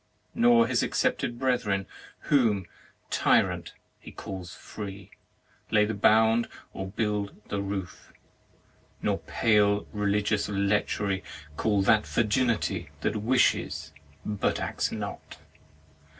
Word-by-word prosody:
Nor 120 -1 +5
his 120 0 +1
accepted 120 - 0
brethren 120 -7 0 0.4
whom, 115 - +2 0.5
tyrant, - - +2 0.3
he - - -11
calls 95 -3 -7
free, 100 -2 -8 0.6
lay 105 -1 +4
the 110 - -2
bound 110 +3 +4 0.3
or 95 - -5
build 105 0 -2
the 100 - -1
roof. 100 -2 -5 0.9
Nor - - +1
pale 105 -2 +2
religious 105 0 0
lechery 100 -1 0 0.3
call 100 +3 +1
that 105 +2 +3
virginity 110 - 0
that 110 - 0
wishes, 110 - +1 0.3
but 105 -2 -1
acts - - -2
not - - -6
105 Hz, 105 wpm, -27 LUFS, 100-115 Hz, 0.9 s, Nor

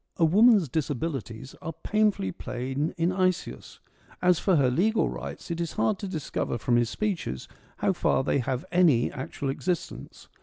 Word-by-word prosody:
A 165 - +4
woman's 205 +1 +5
disabilities 135 -4 -3
are 165 - -5
painfully 210 - +1
plain 130 - -3
in 170 +2 +1
Isaeus: 185 -1 -2 0.4
as 180 -2 +3
for 190 - +2
her 135 -5 +3
legal 215 - +2
rights, - - -7
it 170 0 -2
is 170 - -3
hard 210 -3 0
to 200 - -4
discover 155 -8 -3
from 120 +1 +1
his 120 -1 +2
speeches 180 - -3 0.3
how - - +1
far 130 - +1
they 140 - +1
have 125 0 -2
any 165 -10 +4
actual 135 0 -5
existence. 175 +4 -4
160 Hz, 160 wpm, -27 LUFS, 130-185 Hz, 0.4 s, woman's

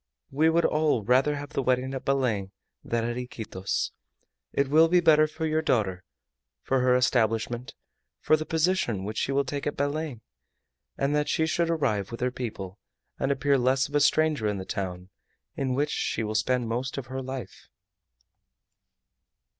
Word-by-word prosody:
We 155 +4 +3
would 165 +1 +3
all 150 -7 +2
rather 130 +6 +3
have 145 0 -6
the - - -1
wedding 130 +1 0
at 135 - -5
Belem 120 -8 0 0.3
than 115 -1 -1
at 120 +1 -2
Iquitos. 110 -6 -3 0.6
It 140 - +1
will 155 +4 +5
be 180 +2 +4
better 155 -2 +5
for 160 +1 -4
your 155 0 +1
daughter, 100 - 0 0.6
for 135 - +1
her 125 0 +3
establishment, 120 -1 0 0.4
for 155 - +4
the 155 - -3
position 160 - 0
which 105 +2 -3
she - - -1
will 140 0 +1
take 140 +2 -3
at 145 - -3
Belem, 145 -3 -2 0.8
that 150 +2 0
she 160 - +2
should 165 +1 0
arrive 110 - 0
with 115 - -7
her 125 0 +1
people, 105 -7 -6 0.4
and 135 - +1
appear 140 0 +2
less 130 +2 +2
of 145 - -16
a 145 - +4
stranger 150 -5 +2
in 105 -1 -1
the 95 - -6
town 90 -2 -4 0.5
in 130 -2 -1
which 145 +2 0
she 110 - -1
will 105 0 -3
spend 125 +2 +1
most 125 +5 -3
of 135 - -4
her 130 +2 -5
life." 130 -1 -7
130 Hz, 170 wpm, -27 LUFS, 115-150 Hz, 0.8 s, will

